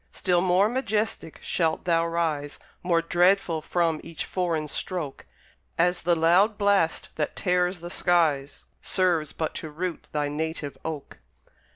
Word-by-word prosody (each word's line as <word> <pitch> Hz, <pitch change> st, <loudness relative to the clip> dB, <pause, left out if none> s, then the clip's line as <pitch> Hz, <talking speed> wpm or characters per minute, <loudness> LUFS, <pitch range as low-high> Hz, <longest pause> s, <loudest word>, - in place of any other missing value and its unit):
Still 180 Hz, -2 st, +1 dB
more 185 Hz, +2 st, +4 dB
majestic 220 Hz, -, -2 dB
shalt 165 Hz, -2 st, 0 dB
thou 165 Hz, -1 st, +2 dB
rise, 160 Hz, -4 st, -1 dB, 0.2 s
More 170 Hz, -2 st, +2 dB
dreadful 175 Hz, -1 st, +3 dB
from 165 Hz, -1 st, 0 dB
each 165 Hz, -1 st, -6 dB
foreign 170 Hz, -4 st, -1 dB
stroke; 160 Hz, -2 st, -5 dB, 0.5 s
As 180 Hz, +1 st, +2 dB
the 170 Hz, 0 st, +2 dB
loud 180 Hz, +6 st, +4 dB
blast 200 Hz, -5 st, +2 dB
that 150 Hz, -, -2 dB
tears 180 Hz, -1 st, +1 dB
the 175 Hz, 0 st, -7 dB
skies 155 Hz, -7 st, +1 dB, 0.2 s
Serves 175 Hz, -5 st, +1 dB
but 160 Hz, -, -3 dB
to 160 Hz, -, -6 dB
root 170 Hz, +3 st, -5 dB
thy 150 Hz, -1 st, 0 dB
native 150 Hz, 0 st, -3 dB
oak. 155 Hz, -3 st, -6 dB
170 Hz, 140 wpm, -26 LUFS, 160-180 Hz, 0.5 s, more